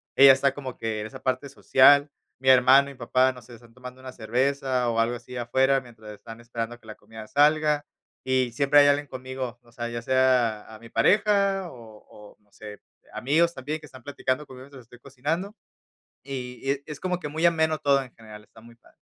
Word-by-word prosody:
ella 135 0 +9
está 135 0 +1
como 135 -3 -8
que 110 -1 -4
en 105 - -5
esa - - -12
parte 130 +2 -2
social, 140 +2 +4 0.3
mi 130 0 +1
hermano 130 +2 +6
y - - -10
mi - - -20
papá, 130 +1 +2
no 125 -1 -14
sé, 120 +2 -15
están 115 0 -17
tomando 125 0 -11
una 130 0 -9
cerveza 130 +2 -1
o 115 -1 -1
algo 115 +2 +1
así 125 +1 -11
afuera 130 +3 +1
mientras 115 -4 -13
están 115 +2 -12
esperando 120 0 -6
que 110 - -21
la 110 - -9
comida 110 +1 -12
salga, 150 +1 +2 0.4
y 130 -2 0
siempre 140 +4 +3
hay 145 - +6
alguien 145 +1 +2
conmigo, 130 -2 -7
o 120 -1 -23
sea, 120 0 -5
ya 120 0 -5
sea 125 -4 +1
a 110 - -12
mi 115 +1 -14
pareja, 195 - +2
o 115 -3 -13 0.2
o 105 -1 -16
no 105 -1 -36
sé, 105 -1 -11 0.3
amigos 165 +6 +1
también 150 +2 -5
que 155 - -14
están 130 -3 -14
platicando 140 +1 -3
conmigo, 130 -1 -12
mientras 140 -2 -14
estoy 120 +1 -18
cocinando. 150 - -4 0.7
Y 125 -2 -7
y 135 - -1
es 140 0 -1
es 150 -2 -9
como 180 -1 -2
que 165 - -6
muy 160 +3 -4
ameno 160 -2 +1
todo 140 -2 +2
en 125 -2 -13
general, 105 -2 -13
está 110 - -19
muy 115 +1 -17
padre. - - -26
130 Hz, 215 wpm, -25 LUFS, 120-140 Hz, 0.7 s, ella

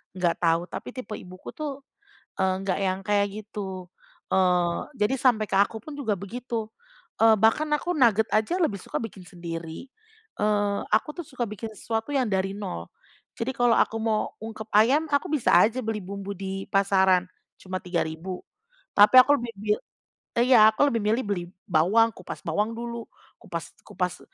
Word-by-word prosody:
nggak 175 -2 0
tahu. 165 0 +2
Tapi - - -6
tipe 255 -2 -8
ibuku 185 0 -10
tuh, 285 -3 -6 0.6
eee, 190 -1 +2
nggak 195 -1 -1
yang 190 -1 0
kayak 205 0 +2 0.2
gitu. 190 -4 -7 0.4
Eee, 180 -2 +2 0.2
jadi 250 +3 0
sampai 235 -5 +3
ke 195 - +2
aku 205 +2 +1
pun 290 +3 -9
juga 225 -7 0
begitu, 225 +3 -5 0.5
eee, 225 0 +6
bahkan 225 +9 +3
aku 320 +4 -2
nugget 225 -4 +4
aja 215 +9 +1
lebih 205 -11 0
suka - - -4
bikin 195 -5 -8
sendiri. 170 +4 -7 0.5
Eee, 205 -1 +1 0.2
aku 220 +7 +1
tuh 345 - -5
suka 255 -3 -3
bikin 220 +1 -6
sesuatu 225 +6 -3
yang 255 -5 +1
dari 195 0 0
nol, 85 - -5 0.5
jadi 230 +3 -3
kalau 245 -1 +3
aku 225 - +2
mau 220 -1 0
ungkep 220 0 -7
ayam, 265 +9 +5
aku 285 -1 +1
bisa 295 -6 +2
aja 225 +8 +4
beli 220 -1 -2
bumbu 200 +1 -6
di 195 +1 -5
pasaran, 190 -2 +3 0.3
cuma 185 0 -5
Rp3.000, 175 +1 -3 0.5
tapi 205 +5 +7
aku 285 +3 +5
lebih 235 -1 -5
bil 210 +1 0 0.6
iya, 235 -3 +7
aku 220 +6 +2
lebih 230 - 0
milih 220 +5 +1
beli 195 -4 -2 0.2
bawang, 190 +8 +4
kupas 185 - -8
bawang 210 +2 0
dulu, 235 0 -5 0.4
kupas 170 -1 -6
kupas 180 -1 -3
210 Hz, 165 wpm, -26 LUFS, 190-230 Hz, 0.6 s, tapi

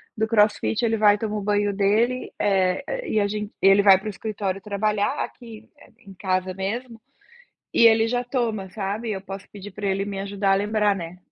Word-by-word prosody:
do 220 0 0
crossfit 220 +1 +2
ele 225 0 +1
vai 210 -1 +5
toma 215 0 -3
o - - -3
banho 205 0 0
dele, 220 +6 +1
eh, 195 - 0
e 215 - +1
a 205 - +2
gente 210 0 -4
e 195 - +5
ele 195 +1 +6
vai 195 -2 +8
pro 215 - -8
escritório 200 -2 -4
trabalhar 210 +5 -1
aqui 230 -3 -13 0.3
em 195 -4 -14
casa 185 0 -2
mesmo, 225 +5 -5 0.7
e 230 - +6
ele 225 0 +5
já 245 +1 -1
toma 230 -6 -2
sabe, 210 +3 -4
eu 190 - -4
posso 195 0 -9
pedir 205 0 -9
pra 205 +2 -6
ele 195 0 0
me 200 -1 -5
ajudar 200 0 0
a - - +5
lembrar, 210 0 +1
né. 170 0 -7
205 Hz, 195 wpm, -23 LUFS, 195-220 Hz, 0.7 s, vai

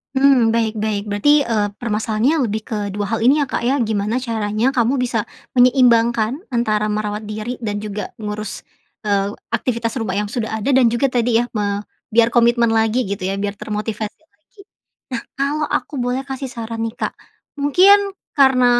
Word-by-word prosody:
Mmm, 265 -4 +4
baik 225 -1 0
baik. 210 -1 -1
Berarti, 290 +9 +4
eee, 220 -6 0
permasalahannya 230 +6 +1
lebih 220 0 -2
ke 220 - -2 0.2
dua 205 0 -2
hal - - -5
ini, 285 +4 +5
ya, - - +2
Kak, - - -2
ya, 255 - +2
gimana 220 +2 -1
caranya 220 0 0
kamu 255 0 +1
bisa 240 -3 -1 0.3
menyeimbangkan 240 -2 +4 0.2
antara 215 -3 +1
merawat 210 0 -2
diri 215 +4 -5
dan 205 -3 -4
juga 210 0 -5
ngurus, 210 -1 -5 0.4
eee, 200 -1 0 0.2
aktivitas 235 -1 -1
rumah 225 -6 -2
yang 205 +1 -1
sudah 220 0 -3
ada, 240 - -1
dan 265 -2 +5
juga 265 +3 +2
tadi, 240 -2 +2
ya, 240 - -4
me 205 -1 -1 0.3
biar 230 0 +5
komitmen 235 0 +3
lagi, 225 0 +1
gitu, 195 -2 -3
ya, 190 - -1
biar 205 0 -3
termotivasi 215 +1 -4
lagi. 320 +7 -32 0.6
Nah, - - -19
kalau 290 +2 0
aku 255 - -2
boleh 250 +2 -1
kasih 270 0 -5
saran, 230 -2 -6
nih, 225 0 -3
Kak, - - -2 0.5
mungkin, 390 +7 +5 0.2
karena 265 -3 +4
230 Hz, 170 wpm, -19 LUFS, 215-255 Hz, 0.6 s, ini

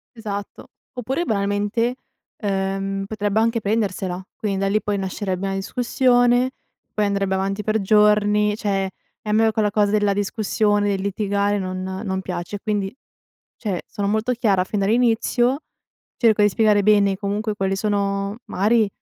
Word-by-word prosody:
Esatto. 205 -3 -6 0.2
Oppure 260 +7 -2
banalmente, 205 +3 0 0.5
uhm, 195 0 -1
potrebbe 210 0 -1
anche 230 0 +1
prendersela. 195 -3 -1
Quindi 200 -3 -2
da 195 - +1
lì 210 +1 +1
poi 205 0 -1
nascerebbe 190 0 -3
una 195 0 -1
discussione, 245 +4 +2 0.4
poi 210 -1 +1
andrebbe 200 -1 0
avanti 195 +2 -2
per 215 +1 +1
giorni, 210 0 +3
cioè, 195 -3 -1 0.4
e 215 - -7
a - - +1
me 220 0 +4
quella 215 -2 +1
cosa 205 -1 +2
della 205 -1 +2
discussione, 205 0 0
del 195 -1 -1
litigare 200 0 0
non 185 0 -4 0.2
non 190 -2 -2
piace. 180 +2 -5
E - - -5
quindi, 205 -2 -2 0.6
cioè, 200 -6 -3
sono 200 -2 -3
molto 220 +4 +1
chiara 205 -6 +2
fin 205 +1 -2
dall'inizio, 240 +5 +2 0.6
cerco 220 -3 +3
di 205 - +6
spiegare 210 0 +3
bene 200 -2 +4
comunque 210 +2 -2
quali 195 -1 -1
sono 200 0 -1
magari, 215 +2 +2
205 Hz, 150 wpm, -22 LUFS, 195-220 Hz, 0.6 s, di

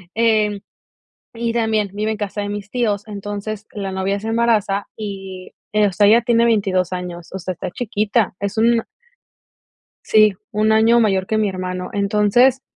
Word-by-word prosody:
eh, 215 -3 +2 0.7
y 230 0 -2
también 220 -3 0
vive 215 +2 -2
en 220 - -2
casa 205 0 -4
de 205 - -4
mis 205 0 -6
tíos, 220 -3 -1
entonces, 205 +1 -6
la 195 -2 -4
novia 190 +1 -1
se 220 - -5
embaraza 220 -3 +1
y, 195 -3 -7 0.2
eh, 210 0 +3
o 195 - -1
sea, 205 +3 +3
ella 230 +3 +6
tiene 235 0 +3
22 195 -6 +1
años, 175 -1 -6
o 190 - -4
sea, 185 0 -4
está 180 - -6
chiquita, 215 -1 0
es 200 +2 -3
un 230 +1 +4
a - - -13 1.2
Sí, 215 -1 +5 0.2
un 215 +1 +2
año 225 +2 +5
mayor 195 -4 +1
que 220 - 0
mi 210 -2 +1
hermano. 185 -1 -4
Entonces, 210 +6 +3
210 Hz, 175 wpm, -20 LUFS, 195-220 Hz, 1.2 s, ella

